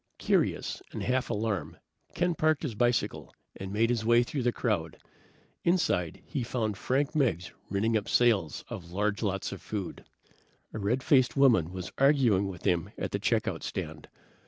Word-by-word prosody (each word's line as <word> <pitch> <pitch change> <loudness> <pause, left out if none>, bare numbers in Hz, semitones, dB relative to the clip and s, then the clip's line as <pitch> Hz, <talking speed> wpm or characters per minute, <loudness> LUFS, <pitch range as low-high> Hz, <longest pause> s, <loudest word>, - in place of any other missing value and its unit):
Curious - - 0
and - - -5
half 130 0 0
alarmed, 105 -3 -2 0.4
Ken 175 0 +1
parked 155 -1 +1
his 140 -7 -2
bicycle 120 +1 0 0.2
and 95 0 -6
made 115 +3 +2
his 115 -2 0
way 120 +1 +5
through 135 +3 -3
the 120 0 +2
crowd. 100 -11 -1 0.7
Inside, 125 - +1
he 145 - -3
found 115 -3 -2
Frank 135 +8 0
Meggs 110 - 0 0.2
ringing 110 +4 +1
up 105 -2 -1
sales 110 -10 +2
of 85 -2 -8
large 100 +2 0
lots 95 -3 -1
of - - -7
food. 100 -4 -5 0.7
A - - -4
red 115 +6 0
faced 130 -2 +3
woman 115 - +4
was 95 0 -6
arguing 130 -9 +4
with 90 -2 -8
him 85 -2 +1
at - - -3
the - - -1
check - - +1
out - - -2
stand. 75 -1 -5
110 Hz, 170 wpm, -29 LUFS, 95-130 Hz, 0.7 s, way